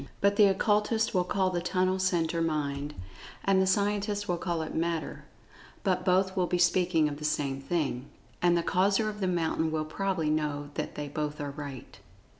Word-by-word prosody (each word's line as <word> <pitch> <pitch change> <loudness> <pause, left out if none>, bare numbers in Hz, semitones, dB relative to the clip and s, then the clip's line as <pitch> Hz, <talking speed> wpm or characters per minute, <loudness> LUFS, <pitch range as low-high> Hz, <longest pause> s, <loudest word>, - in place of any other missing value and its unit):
But 200 0 +3
the 205 0 +7
Occultists 210 +3 +1
will 180 -2 +3
call 185 +1 0
the 175 -1 -1
tunnel 185 +1 +1
centre 170 -3 +1
Mind, 150 -2 -2 0.5
and 195 -1 +4
the 190 - +2
scientists 205 +1 0
will 175 -1 -1
call 170 -3 -1
it 155 - -6
Matter, 165 0 -2 0.6
but 185 -2 +1
both 190 +1 +2
will 180 -1 +1
be 180 - 0
speaking 175 -2 +3
of 145 -1 -4
the 150 - -9
same 140 -3 -1
thing. 140 -4 -2 0.3
And 175 -1 +4
the 170 - 0
Causer 195 +5 +2
of 210 0 -7
the 190 - 0
mountain 165 -2 0
will 155 -1 -1
probably 165 -1 -1
know 145 -1 -2
that - - -4
they 150 -1 -4
both 150 +1 -3
are 145 -1 -3
right. 140 -3 -8
175 Hz, 190 wpm, -29 LUFS, 150-190 Hz, 0.6 s, the